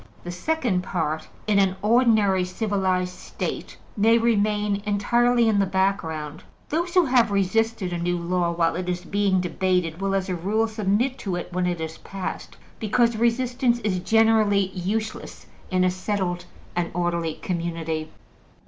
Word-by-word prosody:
The 175 Hz, -, -5 dB
second 225 Hz, -, 0 dB
part, 160 Hz, -4 st, -2 dB, 0.2 s
in 210 Hz, -2 st, +3 dB
an 190 Hz, -1 st, +2 dB
ordinary 215 Hz, -5 st, +4 dB
civilized 185 Hz, -2 st, -1 dB
State, -, -, -6 dB, 0.2 s
may 225 Hz, +3 st, +4 dB
remain 210 Hz, -3 st, +1 dB
entirely 235 Hz, +3 st, +3 dB
in 215 Hz, -2 st, +3 dB
the 195 Hz, -, +2 dB
background: 165 Hz, -6 st, -1 dB, 0.3 s
those 340 Hz, +3 st, -1 dB
who 360 Hz, -2 st, +6 dB
have 250 Hz, -4 st, +3 dB
resisted 200 Hz, 0 st, 0 dB
a 175 Hz, -, -2 dB
new 175 Hz, +1 st, 0 dB
law 175 Hz, 0 st, 0 dB
while 165 Hz, -1 st, +1 dB
it 180 Hz, +1 st, -4 dB
was 180 Hz, 0 st, -3 dB
being 200 Hz, -2 st, +1 dB
debated 180 Hz, -1 st, -1 dB
will, 195 Hz, 0 st, 0 dB
as 195 Hz, -1 st, -1 dB
a 185 Hz, -, -2 dB
rule, 205 Hz, +6 st, 0 dB
submit 220 Hz, +5 st, 0 dB
to 190 Hz, -4 st, -3 dB
it 175 Hz, -, -6 dB
when 180 Hz, 0 st, 0 dB
it 175 Hz, -1 st, -2 dB
is 160 Hz, 0 st, -5 dB
passed, 195 Hz, -1 st, -6 dB, 0.2 s
because 230 Hz, +2 st, +2 dB
resistance 240 Hz, +1 st, +1 dB
is 195 Hz, -4 st, 0 dB
generally 215 Hz, -2 st, +3 dB
useless 205 Hz, +4 st, -4 dB, 0.2 s
in 185 Hz, -1 st, +2 dB
a 185 Hz, -, +3 dB
settled 185 Hz, -1 st, -2 dB, 0.3 s
and 175 Hz, -1 st, 0 dB
orderly 170 Hz, -2 st, -1 dB
community. 165 Hz, -3 st, -3 dB
195 Hz, 155 wpm, -24 LUFS, 180-220 Hz, 0.3 s, who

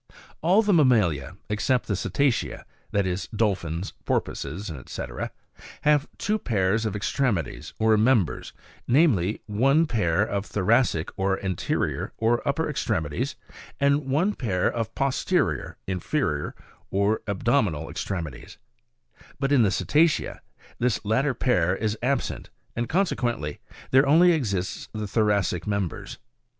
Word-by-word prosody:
9. -, -, -22 dB, 0.2 s
All 185 Hz, +7 st, +4 dB
the 205 Hz, -1 st, +2 dB
mammalia, 105 Hz, -, +3 dB
except 120 Hz, +4 st, 0 dB
the 105 Hz, -, -1 dB
cetacea, 135 Hz, +6 st, 0 dB, 0.2 s
(that 100 Hz, -1 st, +1 dB
is, 90 Hz, +1 st, -2 dB
dolphins, 100 Hz, -5 st, -1 dB
porpoises, 85 Hz, +7 st, -2 dB, 0.2 s
&c.) -, -, -5 dB, 0.8 s
have 150 Hz, -1 st, +3 dB
two 215 Hz, +2 st, 0 dB
pairs 110 Hz, -, +1 dB
of 105 Hz, -, -3 dB
extremities 105 Hz, -, -1 dB
or 110 Hz, 0 st, +4 dB
members, 110 Hz, -, +2 dB, 0.4 s
namely; 120 Hz, -, +3 dB
one 135 Hz, +10 st, +3 dB
pair 100 Hz, -, +1 dB
of 100 Hz, -2 st, -2 dB
thoracic 105 Hz, -4 st, +1 dB
or 95 Hz, 0 st, +1 dB
anterior, 95 Hz, -2 st, -1 dB
or 115 Hz, +1 st, +2 dB
upper 150 Hz, +3 st, +1 dB
extremi 95 Hz, -, -1 dB
ties, 75 Hz, -, -2 dB, 0.4 s
and 140 Hz, 0 st, +2 dB
one 165 Hz, +10 st, +2 dB
pair 95 Hz, -, 0 dB
of 115 Hz, -1 st, -4 dB
posterior 135 Hz, -, 0 dB
(inferior) 90 Hz, -, -2 dB, 0.3 s
or 100 Hz, +3 st, +1 dB
abdominal 100 Hz, -, +1 dB
extremi 85 Hz, -2 st, -4 dB
ties; -, -, -13 dB, 0.8 s
but 140 Hz, 0 st, 0 dB
in 140 Hz, -4 st, +5 dB
the 105 Hz, -, +4 dB
cetacea 150 Hz, -, +1 dB, 0.4 s
this 120 Hz, -3 st, 0 dB
latter 125 Hz, +6 st, +1 dB
pair 90 Hz, -8 st, +2 dB
is 110 Hz, +1 st, -1 dB
absent, 130 Hz, +1 st, -1 dB, 0.3 s
and 120 Hz, 0 st, -2 dB
conse 190 Hz, +2 st, +1 dB
quently, 95 Hz, -, -2 dB, 0.3 s
there 135 Hz, +2 st, +5 dB
only 170 Hz, +5 st, +6 dB
exists 100 Hz, -, -2 dB
the 110 Hz, -1 st, -3 dB
thoracic 100 Hz, -5 st, +1 dB
members. 100 Hz, -4 st, -3 dB
110 Hz, 130 wpm, -25 LUFS, 95-135 Hz, 0.8 s, only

